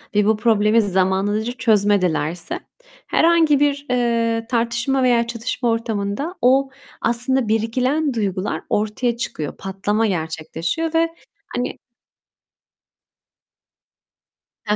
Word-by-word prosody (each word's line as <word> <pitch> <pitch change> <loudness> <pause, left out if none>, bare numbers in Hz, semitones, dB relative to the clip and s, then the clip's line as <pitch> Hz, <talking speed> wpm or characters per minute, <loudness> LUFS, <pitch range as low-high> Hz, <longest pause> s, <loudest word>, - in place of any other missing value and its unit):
ve 210 - +4
bu 220 0 +3
problemi 220 0 +3
zamanından 190 +1 +1
önce 225 +2 -3
çözmedilerse 195 -8 +1 0.5
herhangi 325 -4 +4
bir, 285 -1 +1
eee, 230 -2 +1
tartışma 240 +2 0
veya 235 -2 +3
çatışma 240 +1 -2
ortamında 225 - -2
o 265 +2 +4 0.3
aslında 245 +1 +1
biriken 255 +7 0
duygular 200 -3 -2
ortaya 215 +3 0
çıkıyor, 155 - -4
patlama 205 +3 -1
gerçekleşiyor 165 - -3
ve 330 0 +3 0.5
hani 245 +1 -2 2.9
Ha 210 - +2
230 Hz, 100 wpm, -20 LUFS, 205-255 Hz, 2.9 s, ve